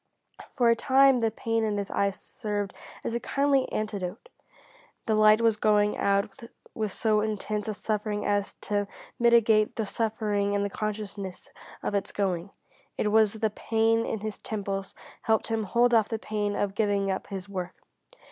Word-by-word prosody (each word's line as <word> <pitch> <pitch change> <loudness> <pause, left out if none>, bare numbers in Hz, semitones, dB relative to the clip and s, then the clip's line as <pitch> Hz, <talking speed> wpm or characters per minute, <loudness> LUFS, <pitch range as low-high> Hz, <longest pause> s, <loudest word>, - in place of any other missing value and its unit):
For 240 -3 +4
a - - +4
time 265 +1 +5
the 225 -1 +2
pain 225 +1 -1
in 210 -2 0
his 200 -1 -3
eyes 200 -1 0
served 205 -2 -4 0.3
as - - -2
a 235 - 0
kindly 275 0 +1
antidote. 210 - -4 0.8
The 220 - +1
light 215 +1 +6
was 225 -2 +3
going 210 -1 +3
out 200 0 0 0.3
with 215 -3 -2
so 215 0 +1
intense 210 0 -2
a 215 - -1
suffering 210 0 -2
as 205 -1 0
to 205 -1 -1 0.3
mitigate 230 -3 +4
the 220 - -1
suffering 210 -2 -1
in 200 0 +1
the 200 - -2
consciousness 205 -3 -5 0.3
of - - -2
its 200 0 -1
going. 190 -2 -1 0.5
It 210 - +1
was 220 -1 +4
the 220 -1 -1
pain 225 +1 +1
in 220 - -3
his 215 -1 -5
temples 195 -2 -4 0.3
helped 220 0 +1
him 225 -1 -1
hold 240 +4 +3
off 220 -2 +4
the 225 - -1
pain 210 -2 -2
of 200 -1 -1
giving 200 -2 +1
up 190 - -4
his 190 -1 -6
work. 185 -2 -5
215 Hz, 170 wpm, -27 LUFS, 200-225 Hz, 0.8 s, light